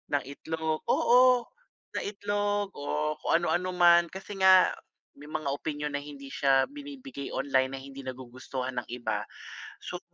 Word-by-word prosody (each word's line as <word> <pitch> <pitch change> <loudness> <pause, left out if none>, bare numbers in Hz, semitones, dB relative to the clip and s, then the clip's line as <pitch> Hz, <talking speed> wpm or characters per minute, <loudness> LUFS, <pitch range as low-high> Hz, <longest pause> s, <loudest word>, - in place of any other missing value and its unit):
ng 140 - +1
itlog, 160 +2 -3
oo, 250 0 +5 0.5
ng - - -1
itlog 205 0 -1
o 150 +1 -1
kung - - -2
ano-ano 185 +1 0
man. 175 -1 +6
Kasi 195 +1 -8
nga 190 -1 +7 0.4
may 145 +1 -13
mga 155 - -3
opinyon 150 0 -3
na - - 0
hindi 140 -2 -10
siya 135 - +3
binibigay 275 - -8
online 130 -1 +1
na - - -6
hindi 135 0 -10
nagugustuhan 130 0 -5
ng - - -9
iba. 110 -4 -2 0.6
So, - - -5
150 Hz, 150 wpm, -29 LUFS, 135-195 Hz, 0.6 s, nga